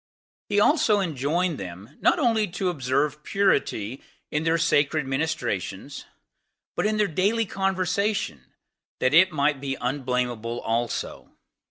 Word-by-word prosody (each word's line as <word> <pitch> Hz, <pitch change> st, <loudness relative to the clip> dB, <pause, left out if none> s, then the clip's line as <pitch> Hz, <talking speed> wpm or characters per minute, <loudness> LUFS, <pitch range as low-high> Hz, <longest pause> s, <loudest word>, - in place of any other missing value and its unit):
He 205 Hz, 0 st, +3 dB
also 215 Hz, -4 st, +4 dB
enjoined 165 Hz, 0 st, -1 dB
them, 95 Hz, +7 st, -9 dB
not -, -, +4 dB
only 225 Hz, -8 st, +2 dB
to 180 Hz, +1 st, -2 dB
observe 145 Hz, 0 st, 0 dB
purity 140 Hz, -, 0 dB, 0.3 s
in 150 Hz, +1 st, -1 dB
their 165 Hz, 0 st, +3 dB
sacred 150 Hz, -2 st, +2 dB
ministrations, 135 Hz, -, -3 dB, 0.7 s
but -, -, +1 dB
in 215 Hz, 0 st, 0 dB
their 210 Hz, -, +3 dB
daily 200 Hz, +7 st, +1 dB
conversation, 190 Hz, -, -1 dB, 0.5 s
that 130 Hz, -, +2 dB
it 185 Hz, +4 st, +6 dB
might 145 Hz, -2 st, +1 dB
be 135 Hz, -1 st, -3 dB
unblamable 125 Hz, -3 st, -2 dB
also. 115 Hz, +1 st, -2 dB
150 Hz, 125 wpm, -25 LUFS, 130-190 Hz, 0.7 s, it